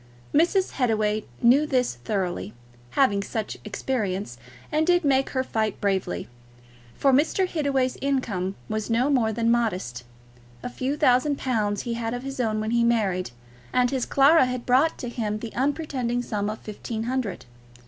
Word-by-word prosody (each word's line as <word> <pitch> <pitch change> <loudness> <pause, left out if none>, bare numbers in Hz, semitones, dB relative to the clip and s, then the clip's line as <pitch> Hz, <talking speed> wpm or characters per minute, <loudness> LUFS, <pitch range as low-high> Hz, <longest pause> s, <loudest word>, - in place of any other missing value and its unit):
Mrs. 355 +5 +3
Hittaway 215 -4 +1 0.2
knew 275 +6 +5
this 255 -4 +1
thoroughly, 175 - -3 0.4
having 205 -8 +4
much 220 -2 -2
experience, 200 - -3 0.3
and 310 +2 +1
did 350 -2 +3
make 270 -1 +3
her 260 -1 -1
fight 220 -5 -1
bravely. 190 - -1 0.7
For 275 -1 +3
Mr. 325 +7 +3
Hittaway's 275 -6 0
income 210 -9 -1
was 215 0 -3
no 245 +5 +2
more 235 -5 +2
than 230 +1 +1
modest. 185 - -1 0.6
A - - -3
few 260 +4 -2
thousand 280 0 +3
pounds 210 -5 -1
he 240 - -3
had 230 0 -2
of 245 - -6
his 270 -1 -6
own 220 -3 0
when 215 +1 -2
he 235 0 +3
married, 205 -6 +1 0.4
and 250 -1 +2
his 260 -3 -1
Clara 280 +1 +5
had 250 -1 -4
brought 265 +6 +3
to 245 - -5
him 220 -3 -2
the 225 +1 -7
unpretending 260 -3 -1
sum 210 -3 -2
of 215 - -4
fifteen 220 +1 -6
hundred. 245 -4 -3
240 Hz, 160 wpm, -25 LUFS, 215-270 Hz, 0.7 s, knew